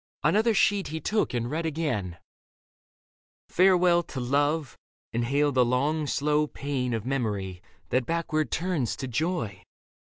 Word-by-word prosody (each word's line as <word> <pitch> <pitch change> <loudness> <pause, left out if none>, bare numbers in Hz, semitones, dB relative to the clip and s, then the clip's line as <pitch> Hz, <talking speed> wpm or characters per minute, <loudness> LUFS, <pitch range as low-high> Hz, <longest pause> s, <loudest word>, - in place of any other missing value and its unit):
Another 220 +1 +3
sheet 200 0 +2
he 160 +1 -4
took 210 +7 0
and 120 0 -2
read 160 +2 -1
again. 140 - -2 1.3
Farewell 180 -1 +4
to 140 - -7
love, 145 +3 0 0.4
and 120 +1 0
hail 145 +3 +2
the 130 -2 +4
long, 145 +5 0
slow 150 +2 +1
pain 135 -5 -2
Of 110 0 -4
memory 105 -9 -2 0.3
that 125 -1 0
backward 160 -2 -1
turns 165 -8 -1
to 130 - -5
joy. 125 - -2
145 Hz, 135 wpm, -27 LUFS, 125-165 Hz, 1.3 s, Farewell